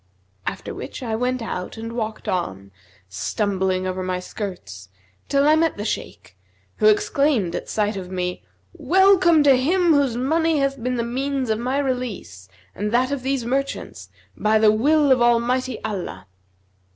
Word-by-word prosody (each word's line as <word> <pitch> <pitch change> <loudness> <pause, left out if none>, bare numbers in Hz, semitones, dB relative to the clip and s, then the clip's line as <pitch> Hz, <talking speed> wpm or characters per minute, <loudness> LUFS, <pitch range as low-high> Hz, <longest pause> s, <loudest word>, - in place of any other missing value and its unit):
After - - -4
which - - -7
I 225 -2 -2
went 250 +1 -1
out 180 -2 -5
and 230 +1 -6
walked 220 -2 -4
on, 100 - -3 0.4
stumbling 190 - -1
over 185 0 -3
my 185 0 -2
skirts, 175 - -7 0.4
till 280 +1 +3
I 305 - +6
met 325 0 +1
the 205 - -4
Shaykh, - - -5 0.4
who - - +3
exclaimed 290 - +2
at - - -5
sight 210 0 0
of 185 -2 -6
me, 180 -1 -3 0.3
'Welcome 370 -4 +4
to 275 -2 +6
him 335 +6 +3
whose 275 -5 +2
money 320 +5 +1
hath 275 -2 -1
been 250 +2 -1
the 235 - -1
means 260 +1 -2
of 220 - 0
my 255 +3 -1
release 250 - -4 0.2
and 210 +2 -3
that 255 +3 +2
of 280 -2 -2
these 265 -2 -1
merchants, 275 +3 -3 0.3
by 215 +1 +2
the 215 -1 +5
will 285 +6 +3
of 255 -2 +4
Almighty 240 +2 +2
Allah.' 185 - -5
240 Hz, 165 wpm, -22 LUFS, 205-275 Hz, 0.4 s, I